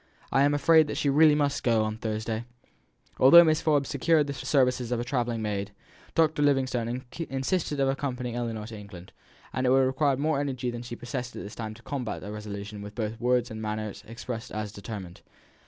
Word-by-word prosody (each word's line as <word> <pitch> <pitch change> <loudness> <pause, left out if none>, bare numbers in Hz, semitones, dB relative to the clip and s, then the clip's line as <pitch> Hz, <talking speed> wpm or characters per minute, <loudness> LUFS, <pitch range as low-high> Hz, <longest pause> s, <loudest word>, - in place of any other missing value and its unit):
I 135 - +3
am 145 +1 +4
afraid 160 +1 +5
that - - -4
she 140 - +1
really 150 +1 +6
must 145 -1 0
go 115 -4 +2
on 110 0 -3
Thursday." 110 0 -3 0.8
Although 170 +7 +9
Mrs. 155 -1 +2
Forbes 145 -3 +2
secured 150 +2 +3
the 140 - -4
services 125 -2 +1
of 120 - 0
a - - -1
travelling 120 -3 -1
maid, 100 -1 -2 0.5
Dr. 160 -2 +3
Livingstone 130 -3 +1 0.3
insisted 145 +3 -1
on 135 - +3
accompanying 125 -3 -2
Ellinor 115 -3 -3
to 110 0 -8
England, 100 -4 -11 0.4
and 130 0 0
it - - +4
would 130 - +5
have 135 - +4
required 135 +1 +1
more 150 0 +1
energy 130 -3 -2
than 120 0 -6
she 120 0 -7
possessed 120 +1 -5
at - - -6
this 105 - -8
time 110 -1 -6
to 120 - -17
combat 125 -9 -4
a 105 - -6
resolution 105 -1 -7
which 105 0 -9
both 110 0 -4
words 125 -1 +1
and 110 0 -6
manner 110 -1 -3
expressed 115 0 -6
as 105 -1 -4
determined. 100 -4 -8
125 Hz, 205 wpm, -27 LUFS, 110-140 Hz, 0.8 s, Although